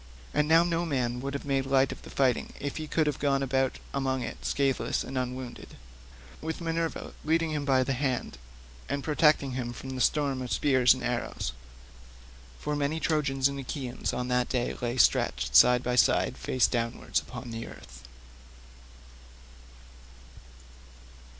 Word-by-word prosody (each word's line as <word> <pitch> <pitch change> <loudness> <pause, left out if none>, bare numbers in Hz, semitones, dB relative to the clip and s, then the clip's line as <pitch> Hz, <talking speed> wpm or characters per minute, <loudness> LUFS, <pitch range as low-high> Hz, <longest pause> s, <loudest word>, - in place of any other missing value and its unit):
And 150 - +2
now 165 +2 +6
no 170 0 0
man 125 -6 -1
would 140 +2 -4
have 140 - -5
made 135 -1 0
light 135 0 +3
of - - -8
the - - -12
fighting 130 -3 +1
if 140 - -4
he 155 -1 -4
could 160 +1 +1
have 150 -2 -1
gone 140 -1 +1
about 135 0 0 0.2
among 135 -2 -1
it 120 - -7
scatheless 135 -2 0
and 135 - -7
unwounded, 125 -1 -5 0.7
with 160 +1 -4
Minerva 165 -1 -3
leading 160 +1 +1
him 150 -2 -2
by 130 -2 +3
the 135 - -1
hand, 130 - -2 0.5
and 140 -1 -2
protecting 150 -2 +3
him 125 -1 -3
from 130 +2 -8
the 130 -1 -3
storm 140 -3 +1
of 125 -2 -5
spears 130 +3 +4
and 130 - -7
arrows. 120 0 -2 1.0
For 150 - -3
many 145 +2 -1
Trojans 140 -5 +1
and 140 0 -5
Achaeans 130 -1 -4
on 125 0 -3
that 125 0 +1
day 125 -2 -1
lay 120 +1 -2
stretched - - +2
side 125 - +7
by 125 0 0
side 125 - +3
face 130 - +1
downwards 115 -1 -1
upon 120 - -8
the 115 0 -5
earth. - - -12
135 Hz, 160 wpm, -28 LUFS, 125-145 Hz, 1.0 s, side